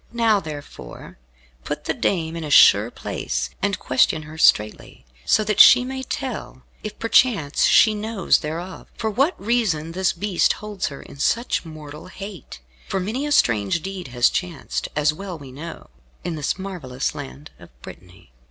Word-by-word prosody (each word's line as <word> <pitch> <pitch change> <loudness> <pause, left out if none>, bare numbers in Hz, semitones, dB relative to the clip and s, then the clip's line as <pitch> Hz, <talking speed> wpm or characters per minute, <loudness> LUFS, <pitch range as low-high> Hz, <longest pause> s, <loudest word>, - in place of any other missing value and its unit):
Now, 225 -3 +3
therefore, 145 - -10 0.4
put - - -5
the - - -1
dame 165 -4 -1
in 165 - -5
a 150 - -5
sure - - +6
place, - - -4
and 200 0 0
question 130 +4 +1
her 155 +1 -11
straitly, 105 - +1 0.2
so 215 - +3
that 210 -1 -1
she 250 0 +9
may 265 +1 -5
tell 260 - -6 0.2
if 215 0 -7
perchance 225 - +2
she 215 - +5
knows 210 -2 +1
thereof 170 +4 -6
for 220 -1 -2
what 275 - +1
reason 200 -8 0
this 185 +1 +1
Beast 185 0 +1
holds 210 -4 -5
her 140 - -8
in 140 - -14
such 230 - 0
mortal 155 -1 -10
hate. 190 - -10 0.3
For 195 - -2
many 230 +10 -3
a - - -4
strange 120 - +2
deed 190 -3 -6
has 120 -1 +2
chanced, 175 -6 -3
as 150 0 +2
well 185 +1 -7
we 140 -4 -11
know, 160 +6 -9 0.3
in 175 - -3
this 150 +3 -2
marvellous 175 -10 -4
land 65 +3 -9
of - - -14
Brittany." 60 - -14
175 Hz, 165 wpm, -22 LUFS, 145-210 Hz, 0.4 s, she